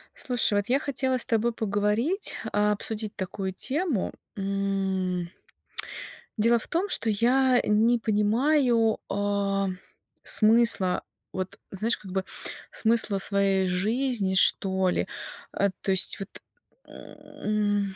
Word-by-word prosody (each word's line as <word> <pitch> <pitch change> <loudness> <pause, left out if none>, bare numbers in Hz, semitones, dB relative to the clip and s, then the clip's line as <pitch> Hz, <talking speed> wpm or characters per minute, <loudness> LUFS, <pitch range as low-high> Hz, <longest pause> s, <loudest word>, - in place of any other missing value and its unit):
Слушай, 245 -5 +1
вот 205 - -5
я 265 +3 +3
хотела 265 -3 -1
с 245 - -1
тобой 230 +1 +1
поговорить, 220 - 0 0.2
а, 210 0 +2
обсудить 215 +1 -3
такую 190 0 -4
тему, 280 - -2 0.2
м. 195 -2 -2 1.1
Дело 230 +2 +3
в - - -7
том, 365 +5 -1
что 230 - +1
я 250 +4 +3
не 225 +3 +3
понимаю, 230 +2 +2
э, 200 -1 0 0.6
смысла, 220 -4 +3 0.3
вот 185 -1 -5
знаешь, 215 +4 -1
как 190 -3 -11
бы 190 0 -2 0.5
смысла 225 -3 +2
своей 195 -1 +2
жизни, 210 +2 0
что 190 0 +3
ли. - - -1 0.5
А, 200 - +1
то 195 - -1
есть, 190 - +4
вот, 195 +1 -6 0.6
м, 205 -2 -3
210 Hz, 115 wpm, -26 LUFS, 195-235 Hz, 1.1 s, есть